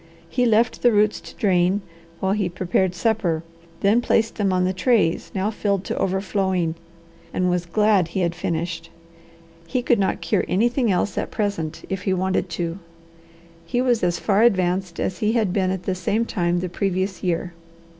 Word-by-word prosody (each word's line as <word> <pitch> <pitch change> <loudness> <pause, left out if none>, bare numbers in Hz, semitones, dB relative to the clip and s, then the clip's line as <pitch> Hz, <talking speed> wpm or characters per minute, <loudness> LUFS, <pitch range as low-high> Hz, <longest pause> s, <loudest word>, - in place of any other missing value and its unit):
He 245 +8 +1
left 230 +2 +2
the 245 - +5
roots 210 0 +2
to - - -12
drain 190 0 +2 0.4
while 190 - 0
he 200 -3 0
prepared 180 +1 0
supper, 180 -6 0 0.4
then 210 +4 +4
placed 225 -1 +1
them 200 -2 0
on 180 0 +2
the 185 - 0
trays, 185 -3 +1
now 195 +3 0
filled 200 -3 -1
to - - -4
overflowing, 190 -3 0 0.6
and 180 -1 +1
was 175 -1 -1
glad 210 -1 +3
he 180 +3 -2
had 170 -1 +1
finished. 170 -1 -3 0.8
He 245 +7 -1
could 240 -2 +3
not 195 - 0
cure 170 -1 0
anything 235 +3 +2
else 185 +2 0
at - - -3
present 200 -8 -3
if 190 0 -3
he 190 - 0
wanted 185 0 0
to. 170 +1 -3 0.8
He 205 +9 -2
was 245 -3 +2
as 175 -1 +1
far 205 +2 +2
advanced 185 -5 +2
as 180 -2 -2
he 215 +1 +1
had 215 -6 +1
been 190 -2 +1
at 185 -1 -3
the 190 - -1
same 200 +5 0
time 175 -4 0
the 185 - -2
previous 190 0 -2
year. 175 -1 -1
190 Hz, 180 wpm, -22 LUFS, 175-210 Hz, 0.8 s, the